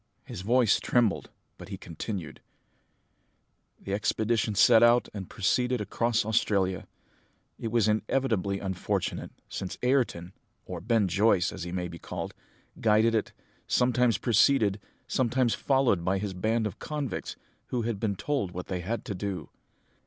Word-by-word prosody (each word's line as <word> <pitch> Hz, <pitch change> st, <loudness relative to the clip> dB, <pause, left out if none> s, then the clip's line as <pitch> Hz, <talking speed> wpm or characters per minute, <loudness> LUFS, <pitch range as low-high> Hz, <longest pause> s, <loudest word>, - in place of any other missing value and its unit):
His -, -, -7 dB
voice 115 Hz, +1 st, +3 dB
trembled, 120 Hz, -4 st, +1 dB, 0.3 s
but -, -, -10 dB
he -, -, -5 dB
continued, 85 Hz, -1 st, -6 dB, 1.4 s
"The 100 Hz, -, -5 dB
expedition 110 Hz, +1 st, 0 dB
set 115 Hz, +2 st, +6 dB
out 120 Hz, +1 st, +5 dB
and 100 Hz, -3 st, -6 dB
proceeded 125 Hz, +5 st, +1 dB
across 110 Hz, +2 st, 0 dB
Australia. 100 Hz, -4 st, +1 dB, 0.7 s
It 115 Hz, -, -4 dB
was 115 Hz, -3 st, +3 dB
inevitably 110 Hz, -2 st, 0 dB
unfortunate, 95 Hz, -2 st, -2 dB, 0.2 s
since 95 Hz, -, -5 dB
Ayrton, 120 Hz, -9 st, +1 dB, 0.3 s
or 90 Hz, -2 st, -6 dB
Ben 110 Hz, 0 st, +2 dB
Joyce, 95 Hz, 0 st, +3 dB
as 95 Hz, -3 st, -6 dB
he 85 Hz, -, -5 dB
may 90 Hz, -1 st, -2 dB
be 85 Hz, -1 st, -9 dB
called, -, -, -6 dB, 0.5 s
guided 110 Hz, +1 st, +4 dB
it, 110 Hz, -, 0 dB, 0.4 s
sometimes 125 Hz, -1 st, +3 dB
preceded, 110 Hz, -3 st, +3 dB, 0.3 s
sometimes 125 Hz, -1 st, +1 dB
followed 130 Hz, -10 st, +2 dB
by 95 Hz, +2 st, +1 dB
his 100 Hz, 0 st, -3 dB
band 110 Hz, +5 st, 0 dB
of 105 Hz, -, -5 dB
convicts, 150 Hz, -4 st, -4 dB, 0.3 s
who 120 Hz, -2 st, -2 dB
had 115 Hz, -3 st, -2 dB
been 100 Hz, -2 st, -1 dB
told 100 Hz, -5 st, -2 dB
what 90 Hz, 0 st, -5 dB
they 90 Hz, -, -2 dB
had 110 Hz, +7 st, -4 dB
to 105 Hz, -, -3 dB
do. 95 Hz, -4 st, -4 dB
110 Hz, 145 wpm, -28 LUFS, 95-120 Hz, 1.4 s, set